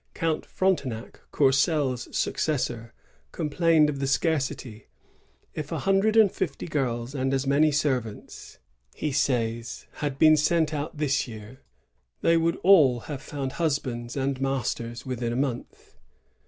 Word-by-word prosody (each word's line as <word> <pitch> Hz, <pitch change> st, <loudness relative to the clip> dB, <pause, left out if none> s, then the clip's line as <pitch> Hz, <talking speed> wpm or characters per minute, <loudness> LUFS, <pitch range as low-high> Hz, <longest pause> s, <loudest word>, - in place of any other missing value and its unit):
Count 165 Hz, -2 st, -1 dB
Frontenac, 140 Hz, -12 st, -1 dB
Courcelle's 135 Hz, -2 st, +2 dB
succes 150 Hz, -5 st, 0 dB
sor, 115 Hz, -1 st, -5 dB, 0.4 s
complained 160 Hz, 0 st, +2 dB
of 145 Hz, -2 st, -3 dB
the 135 Hz, -, -1 dB
scarcity: 135 Hz, -7 st, -1 dB, 0.7 s
"If 155 Hz, -1 st, -6 dB
a -, -, -1 dB
hundred 195 Hz, +3 st, +2 dB
and 215 Hz, -4 st, +6 dB
fifty 170 Hz, -7 st, -3 dB
girls 125 Hz, -5 st, -2 dB
and 135 Hz, -1 st, -1 dB
as 135 Hz, 0 st, -1 dB
many 145 Hz, +3 st, +3 dB
servants," 130 Hz, -7 st, -3 dB, 0.4 s
he 150 Hz, -, -2 dB
says, 115 Hz, -3 st, -1 dB
"had 145 Hz, -2 st, -3 dB
been 155 Hz, +1 st, +6 dB
sent 155 Hz, +1 st, +2 dB
out 150 Hz, +1 st, -4 dB
this 140 Hz, -2 st, 0 dB
year, 110 Hz, +2 st, -11 dB, 0.6 s
they 165 Hz, -, +4 dB
would 165 Hz, 0 st, +2 dB
all 150 Hz, -11 st, +6 dB
have 140 Hz, 0 st, -7 dB
found 140 Hz, -3 st, -5 dB
hus 160 Hz, -3 st, +1 dB
bands 120 Hz, -2 st, -6 dB
and 135 Hz, 0 st, -1 dB
masters 120 Hz, -2 st, -2 dB
within 125 Hz, -2 st, -3 dB
a -, -, -2 dB
month. 130 Hz, -2 st, -4 dB
140 Hz, 140 wpm, -26 LUFS, 125-155 Hz, 0.7 s, and